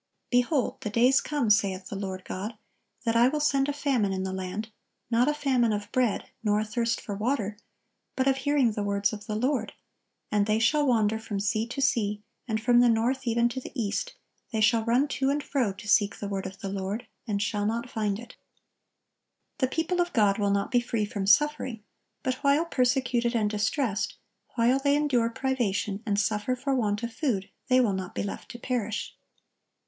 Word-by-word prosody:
"Behold, 245 +2 +1
the 210 - -3
days 245 +5 +4
come, 280 -8 0
saith 195 -3 +1
the - - -5
Lord 190 -2 -5
God, 210 +4 -5 0.5
that 230 0 +1
I 235 +1 +6
will 300 +3 0
send 280 -2 +2
a - - +2
famine 275 -8 0
in 190 0 -2
the 190 0 -3
land, 190 +4 -4 0.4
not 235 +3 +3
a 300 - +3
famine 260 -6 +2
of 205 -1 -3
bread, 250 -5 +1 0.2
nor 210 -1 +2
a 215 - -1
thirst 230 +1 -1
for 205 - -6
water, 215 -1 -1 0.6
but 260 0 +1
of 270 -1 +3
hearing 270 -3 +2
the 210 - -3
words 200 +1 0
of 210 +1 -8
the 215 - -2
Lord: 250 +1 0 0.6
and 205 -1 +2
they 215 0 +2
shall 290 +6 +3
wander 220 -3 +2
from 215 -2 -4
sea 215 +3 0
to 265 +3 -4
sea, 210 -5 +1 0.2
and 220 -2 0
from 240 +2 +4
the 245 0 +6
north 240 +3 +1
even 235 +1 +3
to 250 +2 -4
the - - -8
east, 205 -3 -2 0.4
they 220 - -1
shall 225 +1 +4
run 245 +5 +2
to 270 -1 0
and 290 +1 0
fro 255 -8 0
to 195 - -11
seek 205 -1 +3
the 205 - -5
word 195 -1 -3
of 190 0 -11
the 195 - -3
Lord, 195 +3 -3 0.2
and 205 -2 0
shall 205 +1 0
not 235 +2 -2
find 210 -4 -1
it."(1078) 240 +1 -11 1.2
The 260 - +3
people 350 +2 +1
of 350 0 -2
God 205 -2 +3
will 205 -1 +2
not 200 0 0
be 245 - +4
free 230 -3 -1
from 200 -2 -4
suffering; 250 -1 +2 0.4
but 255 +2 -2
while 285 +4 +4
persecuted 250 -4 +1
and 210 -2 +1
distressed, 220 0 -1 0.4
while 245 +3 +3
they 280 +1 +3
endure 265 -6 +2
privation, 210 -7 -1
and 200 -1 +1
suffer 210 +4 0
for 275 +2 -2
want 210 -4 0
of 235 0 -3
food, 220 -7 -1 0.2
they 255 -2 +5
will 230 -6 +3
not 190 -1 -5
be - - -1
left 200 - -6
to 240 - -8
perish. 225 -4 -3
230 Hz, 205 wpm, -27 LUFS, 205-255 Hz, 1.2 s, I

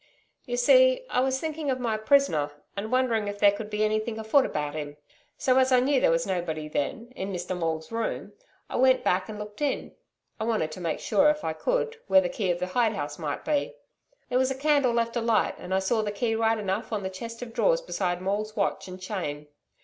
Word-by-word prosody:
'You - - -2
see - - +5
I - - +2
was 265 +1 +1
thinking 310 -1 -3
of 255 -1 0
my 230 -3 0
prisoner, 215 - +3 0.3
and 205 +2 -4
wondering 240 -5 +1
if 205 0 -4
there 205 0 +6
could 210 +1 -6
be 210 0 0
anything 215 +1 0
afoot 220 +5 +3
about 150 -1 -3
him. 145 -1 -6 0.4
So 260 0 +3
as 260 0 +3
I 255 - +6
knew 265 +1 +2
there - - +4
was 165 0 +2
nobody 170 -5 -2
then 225 - -3
in 195 +1 -4
Mr 180 0 -3
Maule's 160 -1 -3
room, 230 0 -3 0.3
I - - -4
went 260 +1 +4
back 185 +3 +1
and 215 - -6
looked 210 +4 -8
in. 290 -2 -1 0.5
I - - -2
wanted 215 -9 0
to 180 - -8
make 165 -3 -2
sure, 290 +1 +4
if 300 0 0
I 160 - -1
could, 475 - -1
where 285 - +6
the 275 -1 0
key 215 -8 -2
of 175 - +1
the 180 - -2
hide 220 +4 +1
house 145 -6 -5
might 150 -3 -4
be. 305 +12 0 0.5
There 250 0 +2
was 260 0 +2
a 265 - -2
candle 285 -3 +3
left 230 0 0
alight, 230 -2 +2
and 180 - -8
I 190 - +3
saw 205 +4 +1
the 210 -1 -2
key 225 +2 -1
right 225 0 +2
enough 195 0 -3
on 210 -3 -2
the 190 - -2
chest 230 +5 -7
of 230 -2 -9
drawers - - +2
beside 180 - -2
Maule's 210 +3 -2
watch 200 -2 -1
and 185 0 -8
chain. 150 -7 -5
220 Hz, 230 wpm, -27 LUFS, 185-260 Hz, 0.5 s, there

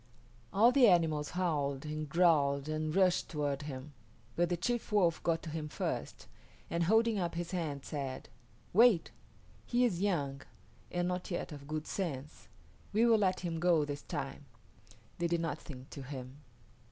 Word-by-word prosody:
All 220 +5 +6
the 255 -2 +6
animals 160 -5 +3
howled 145 -6 0
and 155 0 -4
growled 145 -4 +3
and 155 +1 -2
rushed 185 -2 +3
toward 145 -3 -1
him, 145 0 -7 0.4
but 175 0 +2
the 175 - 0
chief 240 +6 -2
Wolf 180 -6 +3
got 165 -1 0
to 160 - -6
him 155 -1 -4
first, - - -4 0.5
and 170 0 +1
holding 220 +2 +3
up 170 -2 -2
his 175 0 -3
hand 155 -7 -3
said, 135 -3 -4 0.5
"Wait. 220 -3 +5 0.5
He 245 +1 +2
is 185 -7 0
young 145 -9 0 0.5
and 175 0 0
not 180 0 -3
yet 175 - -3
of 140 -1 -9
good 155 +1 -3
sense. 150 -6 -4 0.4
We 220 +3 +3
will 230 -2 +5
let 185 -2 +1
him 170 -2 -3
go 170 -3 +3
this 145 0 -5
time." 135 +1 -5 0.7
They 170 - +1
did 170 0 0
nothing 145 -5 -5
to 140 - -7
him. 130 0 -8
165 Hz, 165 wpm, -33 LUFS, 145-180 Hz, 0.7 s, All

